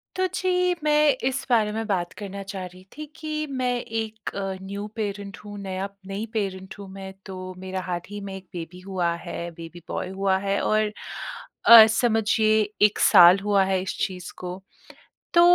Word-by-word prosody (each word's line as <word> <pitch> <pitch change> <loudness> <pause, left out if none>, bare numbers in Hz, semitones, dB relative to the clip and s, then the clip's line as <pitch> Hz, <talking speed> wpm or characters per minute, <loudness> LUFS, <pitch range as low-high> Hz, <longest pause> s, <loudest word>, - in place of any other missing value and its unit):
तो 375 - +1
जी 360 -1 +2
मैं 300 0 +4 0.2
इस 260 0 -2
बारे 220 -4 +3
में 225 +1 -3
बात 180 -4 -1
करना 200 -1 -6
चाह 195 -1 -6
रही 180 +1 -12
थी 305 - -5
कि 310 -1 -5
मैं 255 -2 -1
एक 220 -1 -4
अ, 195 -1 -2
न्यू 200 +2 -5
पैरेंट 200 -2 -4
हूँ 205 0 -8
नया 190 0 -3 0.2
नई 200 +3 -3
पैरेंट 190 -3 -3
हूँ 200 - -8
मैं 190 0 -8
तो, 185 -1 -7
मेरा 185 0 -4
हाल 175 -1 -3
ही 205 0 -6
में 195 -1 -6
एक 190 -1 -10
बेबी 175 +1 -7
हुआ 185 -2 -1
है 170 - -5
बेबी 165 +1 -10
बॉय 185 - -3
हुआ 190 0 +1
है 195 0 +1
और 215 0 +2 0.7
अ, 230 -1 +12
समझिए 220 -1 +3 0.3
1 210 - -8
साल 175 +2 +8
हुआ 200 -1 +3
है 190 -1 +1
इस 190 - -4
चीज़ 180 -2 -8
को। 180 +1 -6 0.7
तो 340 - +7
195 Hz, 180 wpm, -25 LUFS, 185-220 Hz, 0.7 s, अ